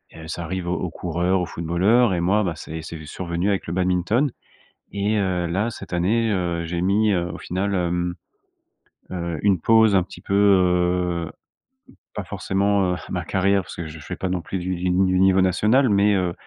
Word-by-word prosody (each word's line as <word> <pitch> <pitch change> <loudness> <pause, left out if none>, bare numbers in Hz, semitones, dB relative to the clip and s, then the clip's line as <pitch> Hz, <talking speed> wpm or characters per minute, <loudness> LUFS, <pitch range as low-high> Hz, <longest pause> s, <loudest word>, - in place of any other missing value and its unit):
heu, 80 0 -10
ça 85 +2 -5
arrive 90 +1 -4
aux 90 - 0
aux 90 - -3
coureurs, 90 +3 -1
aux - - -1
footballeurs 95 +8 +2
et 90 - 0
moi 100 +5 +2
bah, 90 -4 -1
c'est 80 0 -7
c'est 80 0 -8
survenu 85 +4 -3
avec 100 -2 -1
le 85 - -3
badminton 95 +9 +1 0.6
et 100 +2 0
heu, 90 -3 0
là, 95 +7 0
cette 100 -3 -10
année, 110 +6 +1
heu, 85 -3 -1
j'ai 85 +1 -3
mis, 105 +3 +2
heu, 85 -2 0
au - - -7
final, 95 +3 -2
hem, 90 0 -1 1.0
heu, 85 -3 -3
une 100 -3 +3
pause 110 +1 +5
un 95 - +4
petit 90 - -11
peu, - - -5
heu, 90 -3 +2 0.9
pas 105 - -3
forcément, 100 0 0
heu, - - -3
ma - - -2
carrière, 95 +1 +2
parce - - -10
que 85 - -5
je 80 0 -9
fais 75 - -7
pas 95 - -3
non 90 -1 -1
plus 95 - -5
du 90 +1 -2
du 90 +1 -2
ni 95 +1 +2
niveau 95 0 +4
national, 105 +8 +3
mais 100 0 +3
heu, 90 -2 0
90 Hz, 200 wpm, -22 LUFS, 85-100 Hz, 1.0 s, pause